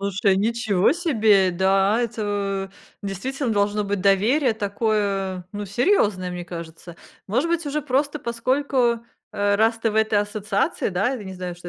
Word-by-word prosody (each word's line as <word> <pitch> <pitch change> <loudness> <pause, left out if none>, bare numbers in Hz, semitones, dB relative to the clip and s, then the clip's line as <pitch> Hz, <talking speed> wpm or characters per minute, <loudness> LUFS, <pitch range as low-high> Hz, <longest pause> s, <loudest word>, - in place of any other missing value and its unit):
Слушай, 200 0 +1
ничего 215 -1 +2
себе, 220 - +3
да, 195 +4 +2
это 205 -4 -2 0.3
в - - -5
действительно 255 +7 -3
должно 205 0 +1
быть 200 -1 -2
доверие 225 +8 +3
такое, 200 -3 -1
ну, 205 0 -4
серьёзное, 205 - +1
мне 180 0 -6
кажется. 170 0 -9 0.3
Может 255 - +1
быть, 340 -1 0
уже 295 +1 -2
просто 285 +2 0
поскольку, 245 0 0 0.3
э, 205 0 +1
раз 225 +2 +2
ты 225 0 0
в - - -7
этой 220 -1 +2
ассоциации, 205 -1 -1
да, 200 +5 0
я 250 -5 -5
не 190 -1 -7
знаю, 180 -1 -5
что 175 0 -10
205 Hz, 160 wpm, -23 LUFS, 195-235 Hz, 0.3 s, себе